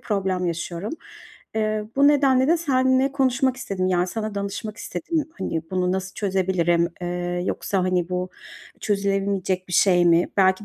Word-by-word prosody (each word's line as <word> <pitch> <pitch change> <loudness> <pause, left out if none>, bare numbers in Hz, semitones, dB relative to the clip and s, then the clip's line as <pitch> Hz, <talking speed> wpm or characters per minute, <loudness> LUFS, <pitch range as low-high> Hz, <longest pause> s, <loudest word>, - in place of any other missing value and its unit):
problem 190 -4 -1
yaşıyorum. 170 +4 -4 0.6
Eee, 215 -1 0
bu 280 +1 +6
nedenle 270 -3 +4
de 335 - +5
seninle 260 -4 +2
konuşmak 265 -1 +1
istedim, 195 -8 -2
yani, 180 -1 +2
sana 215 +2 -4
danışmak 200 +1 -4
istedim. 315 - -3
Hani, 160 - -2
bunu 180 -1 0
nasıl 190 0 -3
çözebilirim, 185 -4 +1
eee, 175 0 -2
yoksa, 195 - -1
hani, 180 -2 0
bu 180 0 -2 0.5
çözülemeyecek 195 -2 -1
bir - - -7
şey 180 -1 +4
mi? 170 +1 +4
Belki 190 +1 +3
195 Hz, 145 wpm, -23 LUFS, 180-225 Hz, 0.6 s, bu